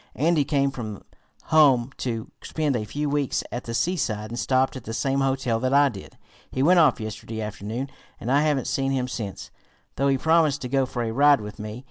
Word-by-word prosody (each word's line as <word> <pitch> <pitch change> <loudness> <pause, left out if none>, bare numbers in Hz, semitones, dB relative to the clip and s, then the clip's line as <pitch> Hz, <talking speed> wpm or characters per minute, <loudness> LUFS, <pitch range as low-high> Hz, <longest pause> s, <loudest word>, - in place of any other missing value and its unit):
Andy 155 +1 +2
came 140 -1 +1
from 110 -6 -7 0.5
home 135 -5 +5
to 115 -3 -4
spend 150 -4 -1
a 110 -3 -2
few 145 +7 -3
weeks 145 -2 0
at 120 - -5
the 115 - -5
seaside, 115 - -1
and 120 - -4
stopped 130 0 +1
at 130 - -8
the 115 - -4
same 135 +2 0
hotel 130 -4 0
that 130 +3 +1
I 145 0 +6
did. 100 -6 -11 0.3
He 130 - -1
went 175 +4 +6
off 150 -7 +4
yesterday 110 +1 -6
afternoon, 110 +4 -4 0.3
and 120 - -3
I 140 +2 +4
haven't 150 -5 +1
seen 135 0 0
him 130 -2 0
since, 105 -6 -6 0.5
though 140 - +2
he 135 -1 +3
promised 160 -1 +3
to - - -3
go 135 0 +1
for 120 -1 -3
a 115 - -2
ride 145 +3 +5
with 105 -1 -8
me. 105 +2 -6
130 Hz, 210 wpm, -25 LUFS, 115-140 Hz, 0.5 s, I